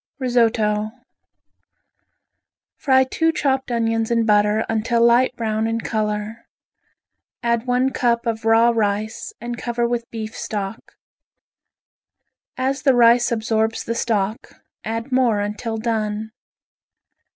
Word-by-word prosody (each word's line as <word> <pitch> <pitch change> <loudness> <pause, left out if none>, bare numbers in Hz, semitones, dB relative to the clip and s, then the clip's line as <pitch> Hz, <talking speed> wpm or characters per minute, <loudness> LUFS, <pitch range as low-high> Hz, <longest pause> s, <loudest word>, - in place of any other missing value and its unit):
Risotto 225 -5 +1 1.9
Fry 265 -1 +3
two 325 +5 0
chopped 265 -4 -1
onions 225 -1 0
in 230 -1 +1
butter 210 0 +3
until 225 +1 0
light 245 +2 +4
brown 220 -1 -1
in 225 0 -1
color. 215 0 -3 1.0
Add 235 0 0
one 250 +2 +2
cup 235 -2 0
of 225 -1 -2
raw 225 +1 +4
rice 215 -1 -2
and 240 +1 -6
cover 240 0 -1
with 235 -1 -3
beef 220 -1 -6
stock. 205 0 -5 1.6
As 265 +2 -1
the 270 -4 +3
rice 240 0 +5
absorbs 220 0 0
the 230 - -3
stock 220 -2 -2 0.2
add 225 +4 -4
more 250 -5 +2
until 210 +2 -3
done. 220 -1 -2
230 Hz, 115 wpm, -21 LUFS, 220-240 Hz, 1.9 s, rice